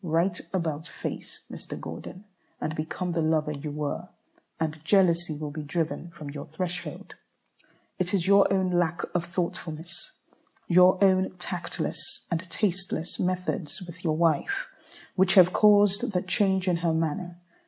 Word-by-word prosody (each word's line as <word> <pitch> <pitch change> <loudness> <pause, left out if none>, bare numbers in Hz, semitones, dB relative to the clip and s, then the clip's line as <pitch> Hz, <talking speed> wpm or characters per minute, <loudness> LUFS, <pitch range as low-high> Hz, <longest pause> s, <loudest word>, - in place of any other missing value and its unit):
Right 175 +2 +1
about 160 -4 -2
face, - - -6
Mr. - - -7
Gordon, 185 - -8 0.4
and 155 - -2
become 170 +3 -3
the 165 -1 0
lover 155 -1 +1
you 150 +1 -5
were, 145 0 -3 0.5
and 160 -1 -2
jealousy 170 -3 +3
will 150 -1 -4
be 155 +1 -5
driven 165 +3 -2
from 155 -4 -8
your 145 -1 -7
threshold. 180 +3 -5 0.9
It 185 0 0
is 185 -4 +1
your 200 +1 +6
own 190 -2 +2
lack 175 -1 +1
of 175 - +1
thoughtfulness, 170 -1 -4 0.5
your 180 +1 +6
own 190 -1 +3
tactless 175 -1 -4
and 170 -1 +1
tasteless 185 -4 -1
methods 180 -2 -2
with 175 0 -11
your 155 -3 +1
wife, 170 - +1 0.5
which 190 0 +4
have 185 -2 +7
caused 205 -1 +5
the 180 - +1
change 190 0 +1
in 175 -2 +3
her 165 -1 +1
manner. 165 +2 -2
175 Hz, 145 wpm, -27 LUFS, 160-185 Hz, 0.9 s, have